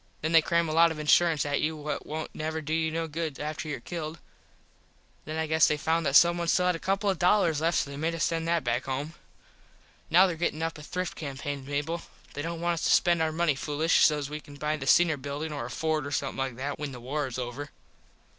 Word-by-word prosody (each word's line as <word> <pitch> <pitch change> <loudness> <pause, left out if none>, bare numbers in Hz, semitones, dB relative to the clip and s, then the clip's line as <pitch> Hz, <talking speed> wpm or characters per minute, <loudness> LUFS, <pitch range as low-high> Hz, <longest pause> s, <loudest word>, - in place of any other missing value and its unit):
Then 160 - -1
they 165 -1 +7
cram 170 +1 +1
a 155 - -2
lot 165 +1 +6
of 160 - -5
insurence 155 0 +3
at 145 0 0
you 160 +1 0
what 150 0 -5
wont 155 +1 -5
never 160 +1 -3
do 155 0 -4
you 160 0 +1
no 165 +1 -2
good 160 -2 -4
after 155 +1 -4
your 140 - -3
killed. 160 +2 -5 1.1
Then 155 +1 -5
I 160 - 0
guess 160 0 +4
they 150 - +1
found 160 +1 0
that 140 - 0
someone 170 +1 +5
still 180 +2 +3
had 180 -1 +2
a - - -6
couple 195 +3 -1
of 190 -3 +1
dollars 175 -4 +3
left 165 +1 +2
so 140 - -1
they 140 - -7
made 165 +3 -1
us 160 - -1
send 165 0 -1
that 170 -3 +1
back 120 +2 -1
home. 140 +4 -3 1.0
Now 180 +4 +7
there 180 -3 -1
gettin 160 -1 -1
up 165 -1 -3
a - - -9
thrift 180 +4 -4
campain 140 -1 -5
Mable. 145 +4 -2 0.3
They 145 - -4
dont 165 +2 -4
want 175 0 +1
us 165 - -4
to - - +2
spend 170 -2 +4
our 160 0 +1
money 165 -1 +1
foolish 150 +4 +1
sos 150 -2 +3
we 150 +1 -5
can 145 -1 -13
buy 150 +2 -1
the 135 -3 -6
Singer 170 -1 +5
Buildin 145 +3 -5
or 140 -5 -4
a - - -6
Ford 155 +2 -1
or - - -6
somethin 140 -1 -2
like 135 -2 -2
that 140 +3 -4
when 145 -2 -4
the 125 - -8
war 140 +4 -2
is 125 - -6
over. 130 +3 -5
155 Hz, 250 wpm, -28 LUFS, 145-165 Hz, 1.1 s, they